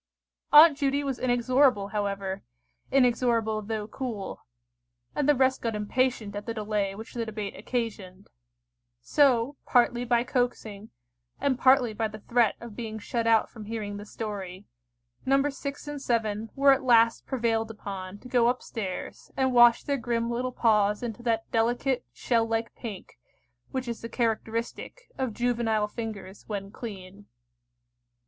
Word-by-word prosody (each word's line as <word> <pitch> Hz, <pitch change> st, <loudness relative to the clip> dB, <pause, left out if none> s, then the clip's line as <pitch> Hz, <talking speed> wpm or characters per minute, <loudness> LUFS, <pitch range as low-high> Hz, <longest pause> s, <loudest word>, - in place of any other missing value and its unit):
Aunt 305 Hz, 0 st, +9 dB
Judy 280 Hz, 0 st, +1 dB
was 270 Hz, -3 st, -3 dB
inexorable 250 Hz, -3 st, +2 dB
however—inexorable 215 Hz, -, -1 dB
though 215 Hz, 0 st, -3 dB
cool; 220 Hz, -, -6 dB, 0.7 s
and 295 Hz, -1 st, +1 dB
the 295 Hz, -, +6 dB
rest 260 Hz, 0 st, +2 dB
got 230 Hz, -2 st, -2 dB
impatient 215 Hz, 0 st, -1 dB
at 205 Hz, +3 st, -6 dB
the 230 Hz, -, -3 dB
delay 210 Hz, -2 st, -1 dB
which 220 Hz, +2 st, -9 dB
the 235 Hz, -, -2 dB
debate 215 Hz, -2 st, -5 dB
occasioned: 205 Hz, -4 st, -4 dB, 0.7 s
so, 270 Hz, -, +2 dB
partly 240 Hz, -1 st, +3 dB
by 240 Hz, -1 st, +2 dB
coaxing, 235 Hz, -5 st, -2 dB, 0.5 s
and 270 Hz, -2 st, 0 dB
partly 255 Hz, -3 st, +4 dB
by 220 Hz, +1 st, -1 dB
the 215 Hz, 0 st, -9 dB
threat 235 Hz, -2 st, +2 dB
of 235 Hz, -3 st, -10 dB
being 220 Hz, -1 st, -5 dB
shut 230 Hz, +2 st, -2 dB
out 225 Hz, -1 st, +4 dB
from 220 Hz, -3 st, -10 dB
hearing 210 Hz, -2 st, -4 dB
the 205 Hz, -, -8 dB
story, 200 Hz, -3 st, -6 dB, 0.6 s
Nos. 275 Hz, +1 st, +1 dB
6 280 Hz, +1 st, -5 dB
and 290 Hz, -1 st, -5 dB
7 220 Hz, -3 st, -1 dB
were 275 Hz, 0 st, +6 dB
at 270 Hz, -, 0 dB
last 230 Hz, -3 st, +4 dB
prevailed 225 Hz, -3 st, 0 dB
upon 195 Hz, -3 st, -7 dB
to -, -, -11 dB
go 245 Hz, -2 st, +3 dB
up 250 Hz, +1 st, 0 dB
stairs 195 Hz, -6 st, -6 dB
and 260 Hz, -1 st, +2 dB
wash 240 Hz, -1 st, +6 dB
their 280 Hz, -1 st, 0 dB
grim 235 Hz, 0 st, -1 dB
little 250 Hz, +2 st, -2 dB
paws 210 Hz, -3 st, +2 dB
into 235 Hz, -1 st, -5 dB
that 230 Hz, -2 st, 0 dB
delicate 240 Hz, +3 st, +1 dB
shell 230 Hz, -2 st, 0 dB
like 225 Hz, 0 st, -2 dB
pink, 205 Hz, -, -9 dB, 0.5 s
which 260 Hz, -1 st, -4 dB
is 235 Hz, -1 st, -4 dB
the 230 Hz, -, -6 dB
characteristic 230 Hz, -, -3 dB
of 260 Hz, -3 st, 0 dB
juvenile 225 Hz, -2 st, 0 dB
fingers 210 Hz, -3 st, -7 dB
when 200 Hz, -2 st, -5 dB
clean. 200 Hz, -3 st, -9 dB
230 Hz, 150 wpm, -27 LUFS, 210-250 Hz, 0.7 s, Aunt